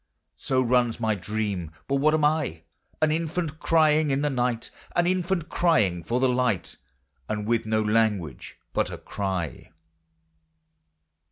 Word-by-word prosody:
So 130 -1 +1
runs 120 -1 +2
my 110 -2 +1
dream: 100 -3 -3 0.2
but 140 - +1
what 155 +3 +3
am 155 -1 +2
I? 150 - 0 0.4
An 155 - +4
infant 160 0 -2
crying 155 -2 +3
in 135 +1 +1
the 150 - +1
night: 125 -2 -1 0.2
An 175 - +3
infant 180 -2 0
crying 105 - +2
for 120 +8 -1
the 130 - +3
light: 125 -6 0 0.5
And 105 -1 -2
with 115 0 0
no 110 0 +1
language 105 - 0 0.2
but - - +1
a - - -6
cry. 95 -5 -4
125 Hz, 145 wpm, -26 LUFS, 105-155 Hz, 0.5 s, An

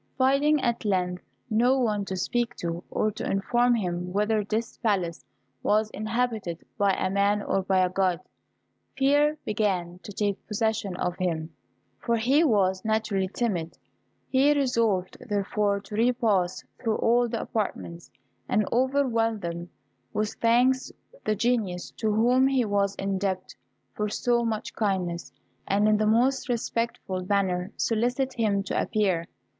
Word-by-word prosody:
Finding 275 +3 +3
at 235 -2 0
length 180 -3 0 0.3
no 245 +3 +3
one 210 -5 0
to 190 - -4
speak 240 +6 -1
to, 170 0 -4
or 215 - 0
to 210 - -7
inform 240 +5 +2
him 180 -4 -2
whether 210 +2 +1
this 220 +3 -3
palace 185 -7 0 0.4
was 215 +1 +2
inhabited 215 -6 -2
by 200 -1 +2
a 185 - 0
man 200 +1 +2
or 195 - 0
by 190 -1 +2
a - - -1
God, 185 -2 +1 0.8
fear 290 +3 +3
began 185 -5 -1
to - - -9
take 205 0 -2
possession 215 -3 -1
of 180 -1 -2
him, 165 -3 -2 0.5
for 235 - 0
he 265 +8 +3
was 190 - +2
naturally 220 -3 0
timid. 185 -6 -2 0.5
He 275 +3 +4
resolved, 230 -9 +1
therefore, 205 0 0
to 195 +1 -13
repass 220 -6 +1 0.2
through 225 -2 0
all 240 +1 +3
the 230 0 -2
apartments, 175 -5 -4 0.4
and 215 -5 +2
overwhelm 240 -3 +1 0.7
with 210 0 -1
thanks 245 +3 +3 0.3
the 215 - +1
Genius 210 -5 -1
to 220 -2 0
whom 245 +5 +4
he 265 -3 +2
was 200 -1 +1
indebted 195 -1 -2 0.4
for 210 0 -2
so 240 +2 +1
much 220 -2 -3
kindness, 185 -5 -2 0.4
and 205 +2 +3
in 215 0 +4
the 215 0 +1
most 250 +5 +2
respectful 230 -5 -2
manner 190 -2 0
solicit 245 +4 0
him 210 -5 +1
to - - -1
appear. 190 -6 0
215 Hz, 140 wpm, -26 LUFS, 190-240 Hz, 0.8 s, He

